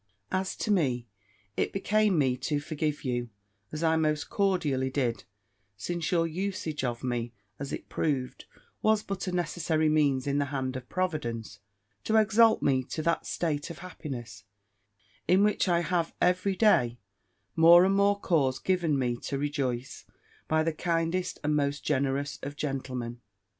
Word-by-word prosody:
"As 185 0 -1
to 215 - -2
me, 130 - +1 0.5
it - - 0
became 205 -1 +2
me 130 -4 +2
to 145 +3 -1
forgive 150 0 -3
you, 120 -2 -2 0.4
as 155 +2 -4
I 160 0 +3
most 155 -2 0
cordially 160 -10 +1
did; 125 -7 -1 0.5
since 170 - -3
your 170 -2 +3
usage 165 -3 -3
of 120 -1 -2
me, 120 -2 -2 0.3
as 140 0 -5
it - - -5
proved, 135 -5 -2 0.4
was 215 -1 +3
but 195 -1 -4
a - - -1
necessary 165 -3 0
means 145 -4 +2
in 140 0 +1
the 145 - +1
hand 130 -2 -3
of 125 -1 -7
Providence, 120 - -3 0.5
to 220 - +1
exalt 220 +1 +5
me 130 -2 +2
to 155 - -4
that 170 +1 0
state 150 -2 -2
of 170 - -7
happiness, 120 - -7 0.8
in 185 +2 +5
which 210 -2 +2
I 170 -1 +3
have 170 -1 -1
every 185 +2 +2
day 125 - +3 0.6
more 170 +2 +8
and 195 - +2
more 200 +1 +3
cause 140 -9 +1
given 170 -3 +1
me 120 -2 0
to 140 - -4
rejoice, 135 -3 -3 0.4
by 155 0 +2
the 165 0 0
kindest 170 +2 -1
and 150 0 +1
most 140 -1 0
generous 140 +1 -1
of 145 +1 -6
gentlemen. 130 -4 -4
155 Hz, 160 wpm, -28 LUFS, 130-180 Hz, 0.8 s, more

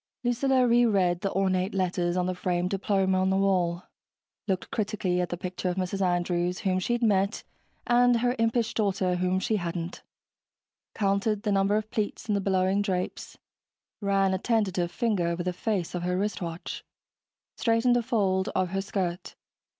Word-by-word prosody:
Lucilla 255 +1 +2
reread 200 -7 +3
the 195 -2 -1
ornate 190 0 0
letters 180 -1 0
on 180 - +1
the 185 - -1
framed 180 0 -1
diploma 195 -1 +1
on 190 - +2
the 190 - +2
wall, 180 -3 +1 0.6
looked 190 -2 -2
critically 200 -4 -1
at 180 - -2
the 175 - -3
picture 180 +1 -3
of 180 - -2
Mrs. 190 +1 -2
Andrews 175 -1 0
whom 185 -1 +1
she'd 240 +5 -1
met 200 -1 +1 0.4
and 245 0 +4
her 245 +1 +1
impish 230 0 +1
daughter 190 -4 0
whom 185 +1 +1
she 220 +2 0
hadn't 170 -1 -4 0.9
counted 200 +1 0
the 210 - 0
number 195 +1 +2
of 215 0 -2
pleats 215 +1 -3
in 210 - +1
the 200 - +1
billowing 190 +1 +1
drapes, 185 -3 -3 0.6
ran 195 -1 +2
a 190 - -1
tentative 190 -6 0
finger 210 -8 0
over 170 +1 -2
the 180 0 -2
face 190 -2 -2
of 180 - -2
her 180 +1 -1
wristwatch, 180 -4 -4 0.7
straightened 230 +1 +2
a 245 - +3
fold 200 -6 0
of 185 -1 +1
her 195 +2 -1
skirt 185 -2 -3
195 Hz, 165 wpm, -27 LUFS, 180-215 Hz, 0.9 s, and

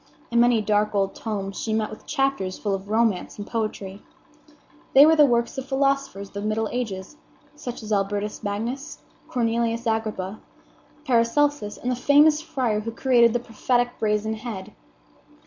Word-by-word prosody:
In 235 - +3
many 240 -2 +4
dark 210 0 +1
old 195 -1 +1
tomes 195 -3 -4
she 220 - -2
met 220 -1 0
with 215 - -11
chapters 270 -9 -1
full 205 -2 -2
of 195 +1 -5
romance 220 -4 +1
and 205 - -6
poetry. 205 -3 -4 0.9
They 280 +2 +10
were 320 +1 +6
the 300 -2 +6
works 235 +1 0
of 265 - -7
philosophers 275 -7 0
of - - -27
the 200 - -4
middle 215 +1 -1
ages, 220 +1 -4 0.4
such 245 -6 -7
as 215 - -7
Albertus 205 +1 -1
Magnus, 235 +8 -4 0.2
Cornelius 230 -1 0
Agrippa, 215 -3 -2 0.7
Paracelsus, 245 -1 +1
and 250 - -2
the - - 0
famous 295 +4 +5
friar 260 -10 -1
who 220 +2 -4
created 235 0 +4
the 240 - +1
prophetic 245 +1 0
Brazen 215 0 0
Head. 215 -3 -7
225 Hz, 160 wpm, -24 LUFS, 210-250 Hz, 0.9 s, They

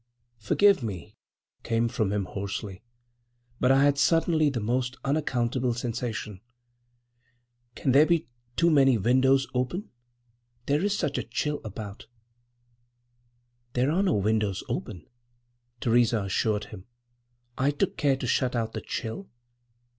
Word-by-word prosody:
"Forgive 200 - +4
me," 100 -7 -6 0.5
came 115 0 0
from 110 -3 -1
him 100 -2 -1
hoarsely. 100 0 -5 0.8
"But 125 - +3
I 135 +1 +5
had 140 -1 +3
suddenly 160 0 +3
the 130 -4 -3
most—unaccountable 125 +1 -1
sensation. 115 -4 -4 1.3
Can 135 - 0
there 145 +4 +6
be 170 -8 +1 0.3
too 170 0 +3
many 135 -4 +5
windows 130 +5 +3
open? 130 - -2 0.7
There 145 +5 +1
is 205 0 +1
such 145 -7 -1
a—chill—about." 110 -5 -5 1.7
"There 130 +4 +1
are 180 +5 +2
no 190 -5 +2
windows 105 -1 0
open," 90 -7 -5 0.8
Theresa 115 -2 +3
assured 105 +2 0
him. 95 -2 -10 0.7
"I 135 +2 +1
took 145 - -1
care 140 -2 +2
to 130 - -5
shut 125 +1 +1
out 115 -1 -2
the - - -4
chill. 120 - -5
125 Hz, 120 wpm, -27 LUFS, 110-145 Hz, 1.7 s, there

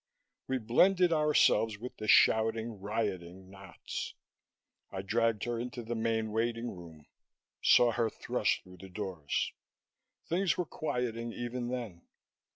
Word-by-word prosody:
We 130 - 0
blended 175 - +4
ourselves 150 -8 +3
with 125 +4 -8
the 110 - -5
shouting, 110 0 +4
rioting 95 -3 -3
knots. 95 -2 -7 0.8
I 95 0 -4
dragged 115 +1 +1
her 120 0 -2
into 120 0 -5
the 115 +1 -4
main 110 -1 -1
waiting 115 +1 -1
room, 80 -4 -12 0.6
saw 120 -1 +6
her 115 -1 0
thrust - - -1
through 90 0 -14
the 95 +2 -11
doors. 90 -6 -3 0.7
Things 180 +2 +1
were 180 - 0
quieting 120 -7 -3
even 120 +1 -4
then. 120 -9 -5
115 Hz, 130 wpm, -31 LUFS, 100-120 Hz, 0.8 s, saw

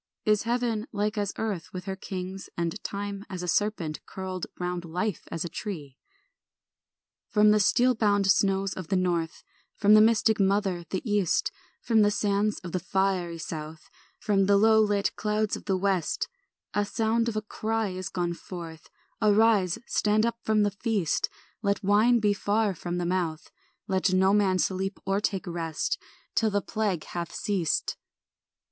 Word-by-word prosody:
Is 210 -1 +3
heaven 240 -2 0
like 210 +1 -1
as 205 -2 -1
earth 205 -7 -3
with 180 -1 -6
her 195 -1 -3
kings 190 0 -6
And 170 +4 -2
time 200 0 -4
as 185 -2 -5
a - - -4
serpent 175 -6 -1
curled 185 -1 -5
Round 180 -1 -3
life 180 +3 -2
as 165 +1 -3
a - - -1
tree? 160 -7 -6 1.3
From 210 -1 +5
the 210 - +4
steel 245 +5 +4
bound 205 -3 +2
snows 195 0 +2
of 185 -4 -7
the 190 - 0
north, 175 -3 -1 0.3
From 210 0 +4
the 215 - +8
mystic 220 0 +4
mother, 195 -3 +1
the 190 +5 -3
east, 205 -5 +1 0.3
From 225 -2 +4
the 205 - +5
sands 205 0 +1
of 175 - -6
the 185 - -1
fiery 185 -2 0
south, 155 -1 -7 0.3
From 195 -2 +1
the 200 0 +5
low 220 +1 +5
lit 205 -2 +1
clouds 210 0 0
of - - -10
the 190 -2 +1
west, 190 -3 0 0.5
A 205 - +2
sound 225 +3 0
of 225 - -5
a 215 - 0
cry 220 0 -2
is 185 0 -5
gone 175 -1 -1
forth; 170 -3 -9 0.3
Arise, 210 -3 +4
stand 215 +1 +2
up 235 0 -2
from 215 -1 +3
the 205 - +1
feast, 200 - 0 0.3
Let 200 0 0
wine 215 +5 +4
be 210 -2 +3
far 205 +1 +1
from 175 +1 -4
the 175 - -1
mouth, 170 -3 -2 0.4
Let 190 -1 +1
no 190 +1 +4
man 200 -3 +3
sleep 190 +3 -1
or 195 +1 +1
take 195 -2 -1
rest, 165 -3 -2 0.3
Till 225 - +2
the 205 -1 +1
plague 205 -7 -1
hath 170 -1 -5
ceased. 190 -6 -1
200 Hz, 170 wpm, -27 LUFS, 180-210 Hz, 1.3 s, the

